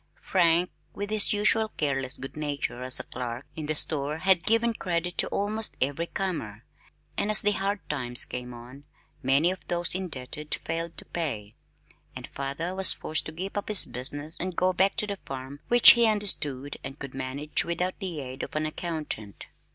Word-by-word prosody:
Frank, 175 -1 +2 0.2
with 205 +1 -5
his 215 -1 +2
usual 215 +1 +2
careless 135 -3 -1
good 135 - -8
nature 145 -4 -3
as 130 0 +1
clerk 125 -1 -5
in 155 -2 -6
the 155 - 0
store 150 0 +2
had 185 0 +3
given 230 +1 +3
credit 175 -3 -3
to - - +3
almost 210 +2 0
every 145 +6 -1
comer, 160 - -4 0.5
and 205 - 0
as 215 - +7
the 205 - +5
hard 200 -2 -2
times 125 -4 +2
came 125 0 -6
on, 125 +4 -12 0.4
many 140 +7 +3
of 185 - -7
those 175 0 +1
indebted 150 -4 -4
failed 165 +1 -5
to - - -10
pay, 115 -11 -4 0.6
and - - -7
father 140 +6 -4
was 190 -1 +9
forced 155 - -2
to - - -6
give 185 +5 -6
up 205 - -3
his 210 -2 +2
business 145 +5 0
and 185 0 -3
go 185 +1 +2
back 190 +2 +2
to - - 0
the 200 -2 -5
farm 135 +1 -8
which 240 0 +9
he 235 -1 +4
understood 150 -10 0
and 135 - -7
could 140 -2 -8
manage 135 +3 -1
without 180 +2 -2
the 180 -7 -5
aid 130 0 -7
of - - -7
an 155 0 0
accountant. 155 - -5
160 Hz, 180 wpm, -27 LUFS, 135-190 Hz, 0.6 s, was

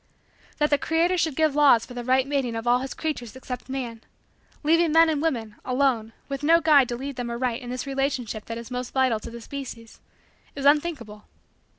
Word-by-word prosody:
That 295 -1 +1
the 290 - +4
Creator 330 +3 +1
should 320 -5 0
give 315 -1 +2
laws 280 -6 +5
for 250 - -11
the 245 0 -5
right 260 +1 +2
mating 275 -4 -1
of 225 +1 -4
all 245 +1 +4
his 265 0 -5
creatures 260 -7 -4
except 255 -1 -7
man 245 -4 -5 0.6
leaving 330 +2 +3
men 325 +1 +6
and 300 -2 0
women, 230 -10 -2
alone, 250 -4 0
with 275 -1 -4
no 330 +3 +5
guide 300 -6 +5
to 240 - -2
lead 275 +1 -6
them 245 -1 -3
aright 235 0 -2
in 245 - -8
this 250 +2 -4
relationship 270 -5 -2
that 230 - -5
is 235 +2 -9
most 250 +1 -5
vital 260 -4 +2
to - - -8
the 235 0 -9
species 235 -3 -8 0.6
is 280 -1 -5
unthinkable. 285 -8 +1
260 Hz, 205 wpm, -25 LUFS, 240-295 Hz, 0.6 s, men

